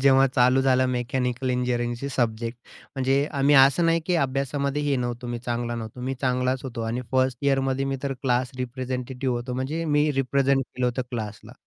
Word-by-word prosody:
जेव्हा 135 0 +5
चालू 125 +2 +4
झालं 130 -1 +3
मेकॅनिकल 125 0 -1
इंजिनिअरिंगचे 125 +1 -1
सब्जेक्ट. 115 0 -1 0.4
म्हणजे 135 +2 +2
आम्ही 140 0 +3
असं 135 +5 +6
नाही 165 0 +3
की 180 - +1
अभ्यासामध्ये 140 +2 -1
हे 145 -2 +1
नव्हतो, 120 0 -3
मी 120 0 -3
चांगला 120 0 -3
नव्हतो, 115 +1 -7
मी 130 +2 -2
चांगलाच 125 0 0
होतो 125 -3 -5
आणि 120 +2 -2
फर्स्ट 130 -1 +2
इअरमध्ये 135 -1 +1
मी 135 0 -1
तर 140 -1 -1
क्लास 125 -1 +1
रिप्रेझेंटेटिव्ह 125 0 -3
होतो, 120 +1 -4
म्हणजे 145 +6 -2
मी 150 0 +2
रिप्रेझेंट 135 0 +2
केलं 125 0 -3
होतं 125 +1 -1
क्लासला 110 -4 -6
130 Hz, 175 wpm, -25 LUFS, 125-135 Hz, 0.4 s, असं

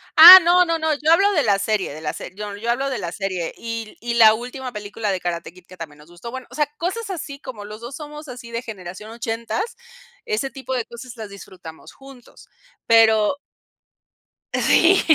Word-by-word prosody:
Ah, 350 +4 +13
no, 355 +1 +5
no, 335 -1 -1
no, 315 -1 0
yo 300 +3 0
hablo 395 +4 +4
de 310 - +2
la 200 -3 +2
serie, 205 -2 -1
de 155 - -10
la 150 -1 -3
se - - -8
yo 205 -1 -6
yo 230 +3 -5
hablo 270 +3 0
de 255 - -3
la 170 -3 -5
serie. 185 -3 -4
Y 230 -1 -6
y 235 +1 -3
la 220 -2 +6
última 250 +2 -7
película 210 0 -4
de 185 - -2
Karate 170 -1 -4
Kid 180 0 -19
que 185 - -15
también 155 -3 -9
nos 150 +3 -18
gustó. 175 +7 -10
Bueno, 260 0 -8
o - - -11
sea, 295 -1 +1
cosas 395 +6 -4
así 305 -6 -6
como 240 -7 -9
los 210 +2 -10
2 245 +4 -8
somos 300 0 -10
así 245 -2 -10
de 235 +1 -3
generación 205 -2 -9
80, 235 - -4 0.5
ese 430 - -2
tipo 260 +1 -5
de 240 -3 -2
cosas 240 +1 -11
las 215 -2 -8
disfrutamos 185 -5 -12
juntos. 270 -3 -16 0.4
Pero 225 +2 +4 1.2
Sí, 370 +3 +4
235 Hz, 205 wpm, -21 LUFS, 205-280 Hz, 1.2 s, Ah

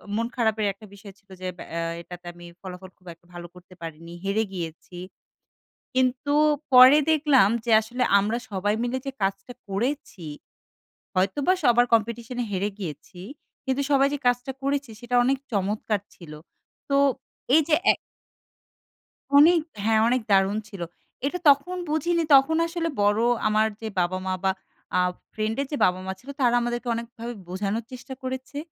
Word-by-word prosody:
মন 230 +1 0
খারাপের 220 -3 +1
একটা 200 +3 -15
বিষয় 200 0 -12
ছিল 200 - -38
যে 185 - -3
ব্যা - - -9 0.4
এটাতে 175 +1 -11
আমি 175 0 -13 0.2
ফলাফল 185 0 -9
খুব 185 - -23
একটা 170 +1 -30
ভালো 175 0 -8
করতে 180 +1 -16
পারিনি। 165 +1 -8
হেরে 200 +3 +1
গিয়েছি। 170 0 -7 1.0
কিন্তু 260 +2 +1 0.4
পরে 255 +3 +9
দেখলাম 290 -9 +4 0.2
যে 235 - 0
আসলে 245 +4 -2 0.2
আমরা 215 +4 0
সবাই 205 +1 0
মিলে 245 +2 -1
যে 275 - -3
কাজটা 195 +5 -2 0.2
করেছি, 200 - -3 0.9
হয়তোবা 195 - +2
সবার 240 0 +5
কম্পিটিশন 235 +2 0
এ - - -4
হেরে 200 +1 -1
গিয়েছি। 165 -1 -8 0.5
কিন্তু 265 +1 0
সবাই 275 -1 +5
যে - - -1
কাজটা 245 +1 0
করেছে 280 -1 -1
সেটা 245 +1 -2
অনেক 270 +2 +2
চমৎকার 210 +1 -1 0.2
ছিল। 170 -4 -12 0.6
তো 280 - +2 0.6
এইযে 315 0 +4 0.2
এ - - +3 1.5
অনেক 330 +4 +7 0.2
হ্যাঁ 220 0 +3
অনেক 255 +1 +2
দারুণ 195 +1 +3
ছিল। 200 -4 -10 0.5
এটা 355 +6 -2
তখন 285 +6 +4
বুঝিনি 335 +3 +1
তখন 275 +4 +5
আসলে 335 0 -2
বড়ো 205 +3 +3 0.2
আমার 215 +1 +3
যে 220 - -4
বাবা-মা 185 +1 -1
বা 190 - +4 0.5
আ - - +4 0.3
ফ্রেন্ডের 220 +6 -2
যে - - 0
বাবা-মা 185 +1 0
ছিল 260 - -19
তারা 245 -2 +3
আমাদেরকে 240 +1 -3
অনেকভাবে 235 0 -6 0.2
বোঝানোর 200 +5 -2
চেষ্টা 255 +1 -8
করেছে। 260 +2 -5
225 Hz, 150 wpm, -25 LUFS, 195-265 Hz, 1.5 s, পরে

